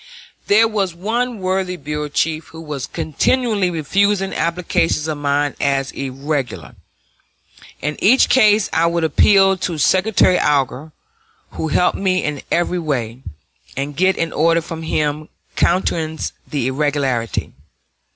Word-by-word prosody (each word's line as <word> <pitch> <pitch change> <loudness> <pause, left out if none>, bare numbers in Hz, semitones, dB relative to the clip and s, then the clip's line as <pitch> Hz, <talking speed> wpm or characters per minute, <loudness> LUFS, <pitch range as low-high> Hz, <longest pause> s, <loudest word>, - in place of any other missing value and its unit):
There 220 +3 +5
was 200 -5 -2
one 230 +6 -2
worthy 185 -1 -2
bureau 150 0 -4
chief 155 +2 -1
who 160 - -12
was 145 -4 -5
continually 210 - 0
refusing 195 +5 0
applications 165 -2 0
of 155 -2 -3
mine 145 0 0
as 135 -1 0
irregular. 135 - -4 1.1
In 150 0 -2
each 250 +6 +5
case 215 -5 +4
I 165 +1 +3
would 170 0 0
appeal 195 +5 +4
to 175 -2 -3
Secretary 185 +4 +3
Alger 145 +1 0 0.6
who 160 - -4
helped 180 +4 +1
me 185 -2 +1
in 150 -2 -3
every 175 +1 +1
way 130 -7 -3 0.6
and 140 +1 -3
get 185 +3 +2
an 165 -1 -2
order 165 +2 +3
from 165 0 -7
him 150 -1 -2 0.3
countenancing 165 -3 0
the 140 -5 -2
irregularity. 135 -4 -1
160 Hz, 130 wpm, -19 LUFS, 145-185 Hz, 1.1 s, There